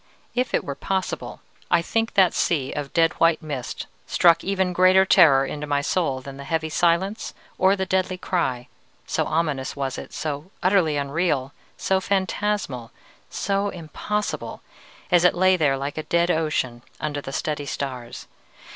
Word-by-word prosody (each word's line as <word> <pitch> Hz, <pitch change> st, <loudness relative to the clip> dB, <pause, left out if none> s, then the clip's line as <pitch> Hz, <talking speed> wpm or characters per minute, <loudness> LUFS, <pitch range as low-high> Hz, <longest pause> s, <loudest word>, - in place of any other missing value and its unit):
If 250 Hz, 0 st, 0 dB
it -, -, 0 dB
were 140 Hz, -, -4 dB
possible, 190 Hz, +6 st, -3 dB, 0.3 s
I 170 Hz, -, +3 dB
think 225 Hz, +5 st, -1 dB
that 190 Hz, -3 st, +5 dB
sea 145 Hz, -6 st, 0 dB
of 145 Hz, -2 st, -4 dB
dead 165 Hz, -1 st, +3 dB
white 165 Hz, -1 st, +4 dB
mist 140 Hz, -5 st, -5 dB, 0.2 s
struck 170 Hz, -1 st, +4 dB
even 190 Hz, -1 st, 0 dB
greater 185 Hz, +2 st, +5 dB
terror 150 Hz, -8 st, +6 dB
into 150 Hz, +2 st, -5 dB
my 145 Hz, -1 st, +1 dB
soul 145 Hz, -4 st, 0 dB
than 135 Hz, +1 st, -9 dB
the 140 Hz, -, -8 dB
heavy 160 Hz, +2 st, -1 dB
silence 175 Hz, +6 st, 0 dB, 0.2 s
or 190 Hz, +1 st, +5 dB
the 190 Hz, -1 st, -2 dB
deadly 185 Hz, 0 st, 0 dB
cry 130 Hz, -10 st, -1 dB, 0.4 s
so -, -, -1 dB
ominous 150 Hz, -5 st, -1 dB
was 135 Hz, -1 st, -3 dB
it, -, -, -10 dB
so 150 Hz, +2 st, -4 dB
utterly 180 Hz, -5 st, +3 dB
unreal, 140 Hz, -1 st, -1 dB, 0.2 s
so 190 Hz, 0 st, +1 dB
phantasmal, 190 Hz, -, -1 dB, 0.4 s
so 200 Hz, +1 st, -1 dB
impossible, 190 Hz, +5 st, -4 dB, 0.5 s
as 175 Hz, -1 st, +5 dB
it 180 Hz, -, +5 dB
lay 185 Hz, +1 st, +4 dB
there 145 Hz, -6 st, +2 dB
like 140 Hz, +3 st, -4 dB
a 155 Hz, -, -7 dB
dead 170 Hz, +1 st, +3 dB
ocean 155 Hz, -7 st, -1 dB, 0.2 s
under 145 Hz, -1 st, -3 dB
the 135 Hz, -, -7 dB
steady 145 Hz, 0 st, -3 dB
stars. 125 Hz, -5 st, -5 dB
165 Hz, 160 wpm, -23 LUFS, 140-185 Hz, 0.5 s, terror